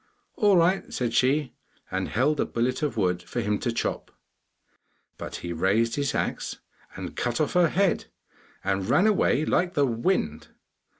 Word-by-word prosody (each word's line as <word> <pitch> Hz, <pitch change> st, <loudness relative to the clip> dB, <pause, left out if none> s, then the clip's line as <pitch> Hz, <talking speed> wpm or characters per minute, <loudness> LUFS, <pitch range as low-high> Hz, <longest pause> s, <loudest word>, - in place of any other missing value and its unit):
'All 205 Hz, -6 st, +4 dB
right,' 180 Hz, +3 st, +2 dB
said 120 Hz, -2 st, -2 dB
she, 135 Hz, +2 st, +2 dB, 0.4 s
and -, -, -1 dB
held 140 Hz, +7 st, +1 dB
a -, -, +2 dB
billet 125 Hz, +2 st, -1 dB
of 150 Hz, -5 st, -2 dB
wood 90 Hz, -3 st, +1 dB
for -, -, -5 dB
him 105 Hz, 0 st, 0 dB
to 120 Hz, -, -1 dB
chop. 115 Hz, -, -3 dB, 1.1 s
But -, -, -6 dB
he 85 Hz, 0 st, -5 dB
raised 105 Hz, +7 st, +1 dB
his 140 Hz, +1 st, -1 dB
axe -, -, -2 dB, 0.4 s
and -, -, -7 dB
cut 120 Hz, -1 st, -1 dB
off 155 Hz, -, 0 dB
her 175 Hz, -2 st, +4 dB
head, 190 Hz, 0 st, +1 dB, 0.6 s
and 95 Hz, 0 st, -1 dB
ran 180 Hz, +8 st, +4 dB
away 190 Hz, -8 st, +3 dB
like 180 Hz, +2 st, +1 dB
the 145 Hz, -, +4 dB
wind. 115 Hz, -, -1 dB
130 Hz, 165 wpm, -26 LUFS, 110-165 Hz, 1.1 s, All